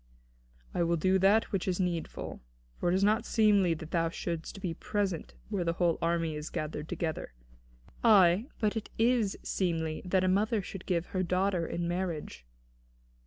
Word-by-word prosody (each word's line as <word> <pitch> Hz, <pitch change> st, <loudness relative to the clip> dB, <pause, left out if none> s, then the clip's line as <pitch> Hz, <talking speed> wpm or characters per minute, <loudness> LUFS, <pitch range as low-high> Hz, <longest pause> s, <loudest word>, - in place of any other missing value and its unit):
"I -, -, 0 dB
will 170 Hz, 0 st, +2 dB
do 185 Hz, +4 st, +3 dB
that 200 Hz, +4 st, +4 dB
which 195 Hz, -3 st, -1 dB
is 185 Hz, 0 st, 0 dB
needful. 175 Hz, -3 st, -3 dB, 0.4 s
For 175 Hz, -, +1 dB
it 175 Hz, -, +2 dB
is 190 Hz, -, +2 dB
not 215 Hz, +3 st, +3 dB
seemly 205 Hz, -7 st, +3 dB
that 160 Hz, 0 st, -9 dB
thou 165 Hz, -1 st, +1 dB
shouldst 170 Hz, +2 st, -5 dB
be 180 Hz, -4 st, -3 dB
present 195 Hz, -1 st, -2 dB
where 200 Hz, -4 st, -1 dB
the 170 Hz, -1 st, 0 dB
whole 170 Hz, -1 st, +1 dB
army 165 Hz, -2 st, 0 dB
is 150 Hz, +1 st, -5 dB
gathered 150 Hz, 0 st, -4 dB
together." 160 Hz, -, -3 dB, 0.7 s
"Ay, 200 Hz, -1 st, +6 dB
but 210 Hz, 0 st, +1 dB
it 220 Hz, -, -4 dB
is 230 Hz, -3 st, +2 dB
seemly 165 Hz, -4 st, -1 dB
that 185 Hz, +1 st, +2 dB
a -, -, +2 dB
mother 205 Hz, +3 st, +2 dB
should 190 Hz, 0 st, -8 dB
give 170 Hz, -2 st, 0 dB
her 185 Hz, -, +1 dB
daughter 185 Hz, -1 st, +1 dB
in 170 Hz, 0 st, -2 dB
marriage." 170 Hz, -, -4 dB
180 Hz, 170 wpm, -30 LUFS, 165-200 Hz, 0.7 s, Ay